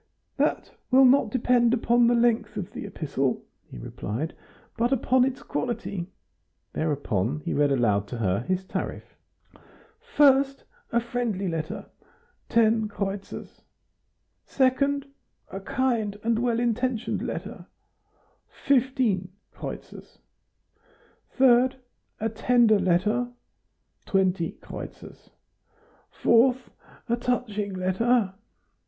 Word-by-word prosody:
"That - - 0 0.2
will 265 +1 +6
not 255 -3 +5
depend 245 0 +3
upon 240 0 +3
the 240 - +4
length 230 -3 +1
of 190 -4 -4
the - - -6
epistle," 135 -4 -2 0.3
he - - -10
replied, 110 - -5 0.4
"but 240 +2 +1
upon 260 0 +3
its 260 0 -2
quality." 220 -7 -3 0.7
Thereupon 145 - -1
he - - -3
read 145 -1 +2
aloud 105 -6 +2
to 120 - -6
her 100 -4 0
his 185 +9 -2
tariff. - - -5 1.0
1st. 275 -1 +4 0.3
A 235 - +3
friendly 235 -5 -2
letter................... 160 -2 -4 0.6
10 220 -1 +3
kreutzers 200 -1 -6 0.9
2d. 275 +1 +2 0.5
A 195 - -5
kind 220 -1 -1
and 230 0 +1
well 235 -1 +1
intentioned 240 0 -1
letter... - - -6 1.0
15 255 -8 +2
" - - -46
3d. 255 0 -2 0.4
A 225 - 0
tender 225 -1 +3
letter...................... 195 +7 +1 0.8
20 190 -4 +1
" - - -29 1.6
4th. 245 +2 +4 0.4
A 235 - +2
touching 220 -5 -2
letter 190 +3 +1
225 Hz, 100 wpm, -26 LUFS, 185-245 Hz, 1.6 s, will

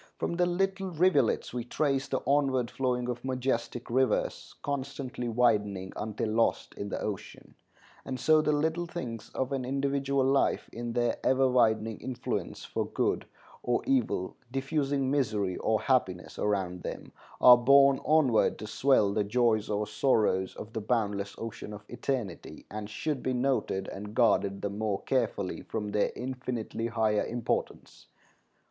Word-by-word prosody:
From - - -2
the 175 0 +3
little 195 +2 0
rivulets 160 -11 +2
we 125 -1 -2
trace 135 +1 0
the - - -1
onward 135 -4 +2
flowing 125 -2 -1
of 120 -1 -4
majestic 130 -2 -2
rivers, 130 +2 0
constantly 135 -3 -4
widening 105 -5 +1
until 110 +1 -3
lost 115 +1 +1
in 100 - -5
the - - -3
ocean; 105 -3 -6 0.5
and 130 -1 -5
so 155 -1 +5
the 150 - +1
little 160 +3 0
things 125 -10 -6
of 130 +1 -1
an 135 -2 -1
individual 140 +1 0
life, 135 +1 +2
in 120 0 -4
their 120 -1 +1
ever 130 +1 +4
widening 110 -3 +2
influence 125 -2 -4
for - - -2
good - - -1 0.3
or 120 -1 0
evil, 260 - 0 0.2
diffusing 135 0 0
misery 105 -9 0
or 110 -1 +1
happiness 95 -9 0
around 95 -4 -1
them, - - -6 0.3
are 125 - +10
borne 140 +2 +6
onward 145 -7 +3
to - - -7
swell 105 -2 +3
the 105 0 +1
joys 110 0 +1
or 105 0 0
sorrows 105 -4 +1
of 110 +1 -9
the 110 - -3
boundless 105 -3 -1
ocean 115 -2 -6
of 105 0 -10
eternity, 125 -8 -4
and 105 0 -5
should 145 +5 -3
be 130 - -1
noted 125 -7 0
and 105 +2 -8
guarded 100 -5 +2
the 100 - 0
more 105 -1 -2
carefully 115 -7 -1
from 105 -2 -4
their 105 0 +1
infinitely 125 -3 -4
higher 110 -2 +1
importance. 120 -1 -3
120 Hz, 150 wpm, -29 LUFS, 105-135 Hz, 0.5 s, are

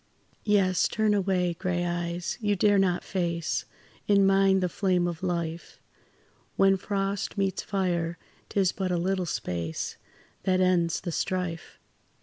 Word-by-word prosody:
Yes, 190 -4 +3
turn 215 -1 +1
away, 185 -3 +1
grey 175 0 -2
eyes, 175 0 -2
you 205 -1 +1
dare 205 +1 +4
not 180 -2 +1
face 170 -3 -2 0.4
In 200 -1 +5
mine 195 0 +4
the 180 - +1
flame 180 0 +1
of 170 -2 -3
life; 170 -2 -3 0.8
When 195 0 +5
frost 195 +1 -2
meets 195 -2 0
fire, 175 -4 -1 0.3
'tis 190 -3 +2
but 190 -1 -3
a 175 - +1
little 185 +1 0
space 85 - -3 0.4
That 185 -1 +1
ends 175 -3 +2
the 175 - -4
strife. 180 -1 -3
185 Hz, 135 wpm, -27 LUFS, 175-195 Hz, 0.8 s, In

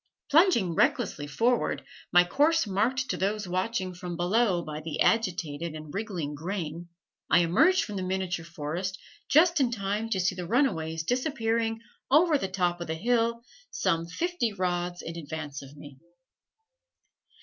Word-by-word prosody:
Plunging 290 - +4
recklessly 145 -2 +1
forward, 235 +11 0 0.3
my 175 0 +7
course 300 - +2
marked 235 +7 0
to - - -2
those 205 +1 -1
watching 185 +1 -1
from 175 -1 -6
below 180 0 +2
by 155 -1 -6
the 160 0 -5
agitated 170 -7 0
and 155 -1 -9
wriggling 190 -8 -3
grain, 170 +1 -5 0.4
I - - +6
emerged 270 - +4
from 205 -2 -5
the - - -2
miniature 185 -2 -2
forest 170 +4 -4 0.3
just 335 +2 +5
in 260 -3 +3
time 210 0 -2
to 195 - 0
see 185 +1 +1
the 180 -2 -6
runaways 165 - +1
disappearing 230 - 0 0.3
over 310 +1 +5
the 195 - -2
top 180 -2 -1
of 170 - -4
the 160 - -2
hill, 235 +4 +1 0.3
some 165 - 0
fifty 340 - -1
rods 175 -2 -2
in 165 - -6
advance 150 -3 -6
of 140 +1 -13
me. 145 -2 -12
185 Hz, 150 wpm, -28 LUFS, 170-230 Hz, 0.4 s, my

